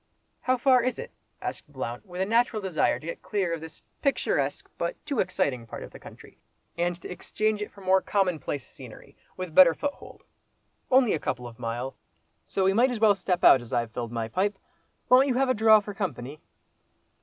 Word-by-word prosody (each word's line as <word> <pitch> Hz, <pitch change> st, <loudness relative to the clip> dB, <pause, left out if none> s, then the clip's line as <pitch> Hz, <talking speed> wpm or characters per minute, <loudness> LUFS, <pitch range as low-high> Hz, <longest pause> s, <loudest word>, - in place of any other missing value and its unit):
"How 255 Hz, 0 st, +1 dB
far 255 Hz, 0 st, +4 dB
is 255 Hz, +2 st, -1 dB
it?" 485 Hz, -, -7 dB, 0.3 s
asked 150 Hz, -, -6 dB
Blount, 130 Hz, -, -6 dB
with 180 Hz, 0 st, -5 dB
a -, -, +2 dB
natural 230 Hz, +1 st, +2 dB
desire 190 Hz, -6 st, 0 dB
to -, -, -13 dB
get 170 Hz, -, -6 dB
clear 190 Hz, -5 st, -1 dB
of 165 Hz, -, -4 dB
this 160 Hz, -1 st, -11 dB, 0.2 s
picturesque, 275 Hz, -, 0 dB
but -, -, -1 dB
too 280 Hz, -6 st, -2 dB
exciting 125 Hz, -11 st, -1 dB
part -, -, -7 dB
of -, -, -10 dB
the -, -, -12 dB
country, -, -, -14 dB, 0.4 s
and 175 Hz, 0 st, -1 dB
to -, -, -6 dB
exchange 215 Hz, +3 st, -2 dB
it 210 Hz, -, -4 dB
for 200 Hz, -, -15 dB
more 190 Hz, 0 st, +3 dB
commonplace 175 Hz, -8 st, -1 dB
scenery, -, -, -13 dB, 0.2 s
with 185 Hz, -3 st, -5 dB
better 170 Hz, -2 st, +7 dB
foothold. 285 Hz, -1 st, -6 dB, 0.7 s
"Only 255 Hz, -4 st, +4 dB
a 160 Hz, -, -1 dB
couple 125 Hz, -3 st, -3 dB
of 115 Hz, 0 st, -13 dB
mile—so 125 Hz, +10 st, -6 dB
we 190 Hz, +1 st, +3 dB
might 240 Hz, +5 st, +4 dB
as 245 Hz, -3 st, -3 dB
well 215 Hz, -2 st, +6 dB
step 185 Hz, -2 st, -2 dB
out, 130 Hz, -, +8 dB
as 120 Hz, -, -12 dB
I've 115 Hz, -1 st, 0 dB
filled 120 Hz, 0 st, -5 dB
my 115 Hz, -1 st, -3 dB
pipe. 195 Hz, -, -1 dB, 0.5 s
Won't 255 Hz, +2 st, +6 dB
you 255 Hz, -, 0 dB
have 265 Hz, +1 st, +2 dB
a -, -, +4 dB
draw 220 Hz, -1 st, +6 dB
for 205 Hz, 0 st, -7 dB
company?" 155 Hz, -, -5 dB
190 Hz, 200 wpm, -27 LUFS, 145-220 Hz, 0.7 s, out